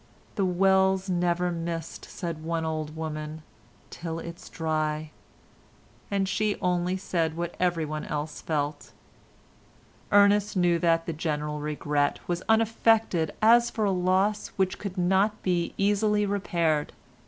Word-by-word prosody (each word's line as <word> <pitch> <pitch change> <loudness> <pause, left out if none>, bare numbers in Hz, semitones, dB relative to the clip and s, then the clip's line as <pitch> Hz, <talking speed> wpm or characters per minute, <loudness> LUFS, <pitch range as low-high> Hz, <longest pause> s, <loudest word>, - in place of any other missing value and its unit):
"The 195 - 0
well's 190 +1 +3
never 175 0 +1
missed," 165 -1 -5
said 170 -4 -5
one 165 0 -2
old 155 -1 -3
woman, 155 0 -5 0.5
"till 165 -1 -5
it's 170 0 -8
dry," 155 -1 -2 1.0
and 195 -1 0
she 205 +1 0
only 180 0 0
said 165 -4 -1
what 170 0 -3
everyone 160 -4 -1
else 150 +1 -4
felt. 145 -2 -3 1.2
Ernest 205 0 +4
knew 175 -2 +3
that 165 -1 +2
the 165 - -3
general 150 -1 -2
regret 145 -1 0
was 175 0 -1
unaffected 225 -6 +3
as 235 +2 +6
for 220 - -1
a 200 - +2
loss 185 +3 +1
which 190 -2 0
could 200 -2 -6
not 190 +4 +2
be 175 -2 0
easily 210 +1 +2
repaired. 170 -6 0
175 Hz, 130 wpm, -27 LUFS, 160-195 Hz, 1.2 s, as